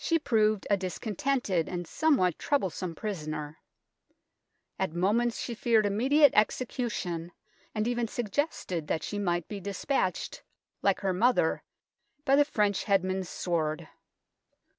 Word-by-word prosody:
She 330 - +3
proved 215 -8 +2
a 200 - +3
discontented 195 - -1
and 175 -1 -4
somewhat 220 - +2
troublesome 185 - -1
prisoner. 155 -7 -5 1.2
At 190 -4 -1
moments 225 +7 +1
she 240 - -3
feared 225 -2 +2
immediate 265 +8 +4
execution, 210 -7 0 0.4
and 215 +1 0
even 240 -1 0
suggested 210 - -2
that 155 - -1
she 205 - -3
might 175 -4 0
be 205 - -5
despatched, 195 +1 -2 0.4
like 195 -1 +2
her 190 -2 +1
mother, 240 +7 +2 0.6
by 270 - +5
the 290 +1 +5
French 210 -8 0
headsman's 190 -2 +1
sword. 155 -3 -2
200 Hz, 120 wpm, -29 LUFS, 180-240 Hz, 1.2 s, by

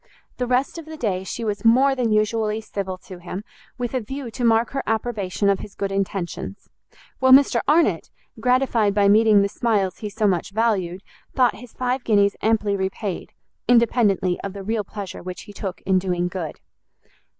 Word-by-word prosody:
The 250 - -1
rest 255 +6 0
of 325 - -10
the 315 0 -8
day 190 -8 -1
she 230 +4 -5
was 210 -1 -2
more 260 +4 +5
than 245 -4 0
usually 215 0 +1
civil 195 -3 -5
to 185 -2 -10
him, 180 +3 -6 0.3
with 245 -1 -3
a 255 - 0
view 265 +2 -6
to 245 - -5
mark 230 0 +3
her 270 - -2
approbation 215 -3 -1
of 200 -1 +3
his 205 - -9
good 200 -1 -3
intentions: 195 0 -4 0.5
while 260 0 +4
Mr 260 -3 +6
Arnott, 320 +4 +3 0.3
gratified 250 -5 +2
by 205 -1 +4
meeting 210 0 +5
the - - +1
smiles 200 -3 0
he 210 - -4
so 215 +1 -1
much 180 -4 +1
valued, 195 -5 0 0.3
thought 250 -2 +4
his 245 0 -13
five 250 0 -1
guineas 200 -2 +3
amply 215 -2 +1
repaid, 190 0 -4 0.3
independently 220 -6 +3
of 200 - -4
the 200 -1 -7
real 220 +1 -1
pleasure 200 -1 -7
which 180 -1 -7
he 205 - -12
took 195 -2 -6
in 190 -1 +2
doing 180 -1 -1
good. 175 -4 -5
215 Hz, 185 wpm, -22 LUFS, 195-240 Hz, 0.5 s, Mr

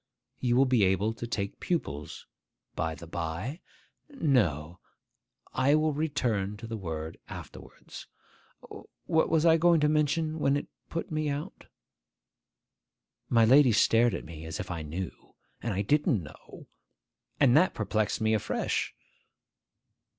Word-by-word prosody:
You 120 -2 +1
will 135 +2 +5
be 125 -5 +3
able 95 +4 +2
to 120 +1 -6
take 100 -3 -3
pupils. 75 - -3 0.5
By 80 0 -2
the 80 - -11
bye! 85 - -4 0.5
No: 90 - 0 0.7
I 135 +3 +3
will 155 0 +2
return 125 -10 -1
to 115 - -9
the 115 0 -5
word 80 -5 -5
afterwards. - - -10 1.0
What 160 0 +2
was 160 0 +2
I 165 -1 +6
going 170 0 +4
to 150 - +4
mention, 155 +1 +1
when 140 -1 +2
it - - -4 0.2
put 165 - -4
me 155 -1 -1
out?' 145 +1 -5 1.6
My 115 -1 +5
lady 130 +2 +6
stared 115 0 +4
at - - -6
me, 80 0 -9
as 80 0 -6
if 90 - -5
I 85 -2 -4
knew. 80 +4 -7 0.3
And 120 - -2
I 100 +1 -1
didn't 145 - +2
know. 75 0 -13 0.7
And 135 -3 +5
that 180 +5 +4
perplexed 110 0 -1
me 110 0 +2
afresh. 110 - -1
115 Hz, 140 wpm, -29 LUFS, 95-150 Hz, 1.6 s, I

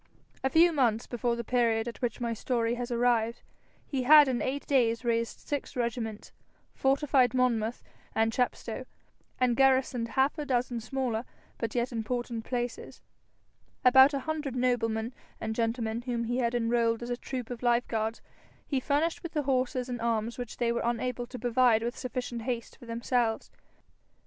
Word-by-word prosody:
A 265 - +2
few 335 +5 +5
months 240 -5 +2
before 240 -1 -1
the 235 - -4
period 230 -1 +1
at 235 - -7
which 240 -3 -2
my 235 -1 -1
story 230 0 0
has 245 0 -4
arrived, 235 -1 +1 0.4
he 270 -3 -2
had 295 +3 +8
in 250 -2 0
eight 275 +2 -2
days 240 -3 +2
raised 230 -1 -1
six 290 -2 -3
regiments, 235 -3 -3 0.4
fortified 270 -2 +2
Monmouth 240 -2 +1 0.3
and 225 0 +2
Chepstow, 250 +1 -2 0.5
and 250 -2 +3
garrisoned 260 -2 +3
half 265 +6 +1
a 300 - -3
dozen 245 -2 0
smaller 245 -1 -2 0.4
but 230 -1 -3
yet 240 +1 0
important 235 0 -3
places. 245 -1 -4 0.8
About 265 +3 +7
a 275 - -2
hundred 305 -4 -3
noblemen 235 -2 0 0.3
and 220 - -3
gentlemen 230 0 -1
whom 240 -1 -2
he 240 +2 -1
had 235 -1 0
enrolled 230 0 +1
as 240 - -5
a - - +1
troop 250 -1 -6
of 240 - -6
life 240 0 +2
guards, 225 0 -2 0.4
he 275 - 0
furnished 315 +9 0
with 340 -4 -7
the 300 -2 0
horses 255 -1 0
and 245 -2 -4
arms 230 0 -1
which 245 -3 -6
they 235 -1 +1
were 235 - -1
unable 240 +1 -2
to 255 - -8
provide 240 -1 +3
with 240 +2 -2
sufficient 250 -2 -4
haste 235 0 -4
for 240 - -15
themselves. 230 0 -1
245 Hz, 170 wpm, -29 LUFS, 230-255 Hz, 0.8 s, had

